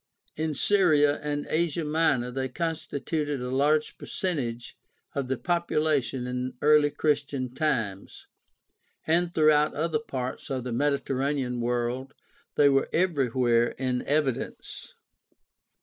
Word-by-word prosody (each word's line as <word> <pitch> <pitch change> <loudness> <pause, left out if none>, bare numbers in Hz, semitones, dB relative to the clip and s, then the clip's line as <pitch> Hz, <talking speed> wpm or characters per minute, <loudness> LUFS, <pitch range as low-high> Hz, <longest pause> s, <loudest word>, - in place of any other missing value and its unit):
In 155 -1 -2
Syria 150 -5 +3
and 145 -1 -2
Asia 165 0 0
Minor 150 -5 +1
they 130 +1 -2
constituted 150 -1 -3
a 125 0 -4
large 150 +3 +1
percentage 125 - -3 0.4
of 140 -2 -2
the 130 0 -1
popula 160 -3 +1
tion 125 +1 -5
in 125 +1 -3
early 150 0 +5
Christian 145 -4 -1
times, 110 -10 -2 0.8
and 170 +2 +2
throughout 155 -2 +3
other 155 0 0
parts 130 -4 -5
of 130 -2 -2
the 125 - -4
Mediterranean 135 -1 0
world 120 +3 -2 0.4
they 145 - +5
were 135 -1 +3
everywhere 130 -8 +2
in 125 -1 -1
evi 145 -3 +1
dence. - - -9
145 Hz, 120 wpm, -27 LUFS, 125-155 Hz, 0.8 s, early